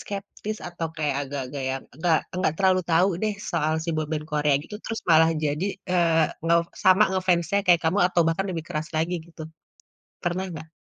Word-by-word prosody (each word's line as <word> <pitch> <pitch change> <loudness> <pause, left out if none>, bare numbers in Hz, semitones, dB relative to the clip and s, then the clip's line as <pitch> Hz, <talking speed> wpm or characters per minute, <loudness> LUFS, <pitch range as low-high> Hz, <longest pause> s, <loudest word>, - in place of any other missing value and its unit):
skeptis 205 +1 -6
atau 170 -1 -4
kayak 150 -3 -1
agak-agak 135 0 -5
yang, 135 0 -3 0.2
nggak 165 -1 +3 0.2
nggak 185 -4 +1
terlalu 185 -1 +4
tahu 175 +4 +4
deh 215 -1 +1 0.2
soal 155 +1 +1
si - - -7
boyband 155 0 -3
Korea 150 -1 +2
gitu 210 - -10
terus 225 - -4
malah 160 0 +6
jadi, 150 +5 0 0.2
eee, 165 -3 +3 0.2
nge 170 0 +4 0.3
sama 190 +2 +6
nge-fans-nya 185 0 +1
kayak 175 -2 +6
kamu 170 +5 +2
atau 175 -1 +1
bahkan 170 +4 0
lebih 165 -3 -4
keras 155 0 -3
lagi 165 +3 0
gitu? 165 -1 -11 0.8
Pernah 175 +2 -1
gak? 160 - -8
165 Hz, 180 wpm, -25 LUFS, 155-185 Hz, 0.8 s, malah